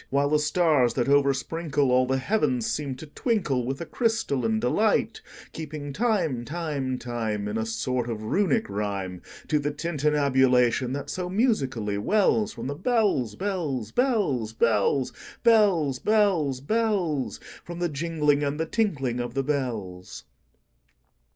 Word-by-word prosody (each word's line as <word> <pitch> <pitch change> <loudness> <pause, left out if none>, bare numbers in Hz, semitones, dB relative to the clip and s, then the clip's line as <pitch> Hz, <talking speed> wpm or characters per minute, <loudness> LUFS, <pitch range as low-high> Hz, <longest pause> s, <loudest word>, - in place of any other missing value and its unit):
While 140 +1 +1
the 150 - +4
stars, 150 -5 +2
that 120 - +1
oversprinkleAll 140 -1 +2
the 130 +1 +1
heavens, 130 - 0
seem 140 -3 -2
to 140 - -9
twinkleWith 140 - -1
a - - -3
crystalline 140 - 0
delight; 210 - +1 0.3
Keeping 150 -2 -6
time, 180 - 0
time, 145 -3 -3
time, 110 -4 -3
In 105 - -3
a 110 0 -1
sort 120 +2 -2
of 110 -2 -4
Runic 205 - +1
rhyme, 100 -3 -3 0.3
To 150 - +2
the 145 0 -1
tintinnabulation 135 -5 +2
that 140 0 -4
so 180 -1 -3
musically 135 - 0
wellsFrom 210 - +1
the 140 - -2
bells, 190 - +1
bells, 160 - -3
bells, 195 - 0
bells, 115 +4 +2 0.3
Bells, 195 - +4
bells, 185 -12 +2
bells—From 175 - -2
the 175 0 0
jingling 150 -1 0
and 145 +1 -2
the 160 - 0
tinkling 145 - -1
of 120 0 -4
the 135 - +1
bells. 115 -11 -4
140 Hz, 130 wpm, -26 LUFS, 125-175 Hz, 0.3 s, the